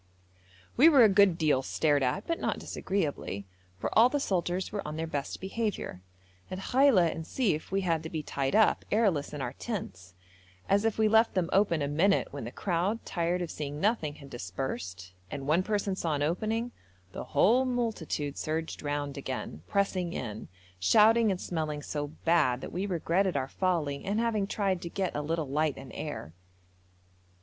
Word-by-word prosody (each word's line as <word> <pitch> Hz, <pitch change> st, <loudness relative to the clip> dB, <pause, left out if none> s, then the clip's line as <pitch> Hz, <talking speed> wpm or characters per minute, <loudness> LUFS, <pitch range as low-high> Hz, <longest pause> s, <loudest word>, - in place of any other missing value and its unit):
We 300 Hz, +7 st, +8 dB
were 275 Hz, -6 st, +7 dB
a 220 Hz, -, +7 dB
good 195 Hz, -3 st, +5 dB
deal 155 Hz, -6 st, +2 dB
stared 145 Hz, +1 st, +1 dB
at, 130 Hz, +10 st, 0 dB
but 335 Hz, -, -2 dB
not -, -, -1 dB
disagreeably, 150 Hz, -, -3 dB, 0.3 s
for -, -, -4 dB
all 230 Hz, +3 st, +7 dB
the 290 Hz, -, 0 dB
soldiers 185 Hz, -5 st, -1 dB
were 205 Hz, -1 st, -2 dB
on 150 Hz, 0 st, -5 dB
their 165 Hz, -, -2 dB
best 145 Hz, -3 st, -4 dB
behaviour. 195 Hz, -, -3 dB, 0.5 s
At 185 Hz, -, -4 dB
Khaila 220 Hz, -, +4 dB
and 160 Hz, -, -6 dB
Sief 175 Hz, -, -1 dB
we 195 Hz, +1 st, +1 dB
had 165 Hz, -4 st, 0 dB
to 160 Hz, -, -6 dB
be 160 Hz, -2 st, -4 dB
tied 135 Hz, -1 st, -1 dB
up, 220 Hz, 0 st, +4 dB
airless, 200 Hz, -10 st, +2 dB
in 145 Hz, -3 st, -4 dB
our 120 Hz, -, -4 dB
tents, 95 Hz, -, -6 dB, 0.5 s
as 200 Hz, +2 st, +3 dB
if 225 Hz, -, +1 dB
we 220 Hz, -1 st, +4 dB
left 220 Hz, +1 st, +4 dB
them 180 Hz, -2 st, 0 dB
open 185 Hz, -6 st, +3 dB
a -, -, 0 dB
minute 170 Hz, +8 st, +2 dB
when 140 Hz, -5 st, -5 dB
the 120 Hz, -, -6 dB
crowd, 190 Hz, -, -1 dB
tired 175 Hz, 0 st, -1 dB
of 170 Hz, -, -5 dB
seeing 145 Hz, -1 st, -5 dB
nothing, 180 Hz, -7 st, 0 dB
had 140 Hz, -2 st, -13 dB
dispersed, 95 Hz, -4 st, -5 dB, 0.2 s
and 135 Hz, -, -5 dB
one 155 Hz, +5 st, +3 dB
person 200 Hz, -1 st, -1 dB
saw 165 Hz, -4 st, -1 dB
an 145 Hz, -, -1 dB
opening, 220 Hz, +9 st, -1 dB, 0.4 s
the -, -, -6 dB
whole 245 Hz, +5 st, +4 dB
multitude 220 Hz, -, -2 dB
surged 160 Hz, +1 st, -3 dB
round 145 Hz, -1 st, -3 dB
again, 130 Hz, -, -5 dB
pressing 185 Hz, -3 st, 0 dB
in, 110 Hz, -4 st, -5 dB, 0.3 s
shouting 220 Hz, -, +5 dB
and 190 Hz, -2 st, -1 dB
smelling 155 Hz, -4 st, -3 dB
so 145 Hz, 0 st, -3 dB, 0.2 s
bad 155 Hz, -7 st, +3 dB
that -, -, -7 dB
we 190 Hz, +4 st, -2 dB
regretted 180 Hz, 0 st, +1 dB
our 130 Hz, -1 st, -1 dB
folly 155 Hz, -4 st, -1 dB
in 200 Hz, +2 st, -1 dB
having 225 Hz, -3 st, +1 dB
tried 195 Hz, -4 st, -1 dB
to 170 Hz, -, -5 dB
get 190 Hz, +1 st, -2 dB
a 150 Hz, -, -1 dB
little 160 Hz, 0 st, -2 dB
light 150 Hz, +1 st, 0 dB
and 135 Hz, -2 st, -10 dB
air. 145 Hz, -, -6 dB
170 Hz, 185 wpm, -29 LUFS, 145-200 Hz, 0.5 s, We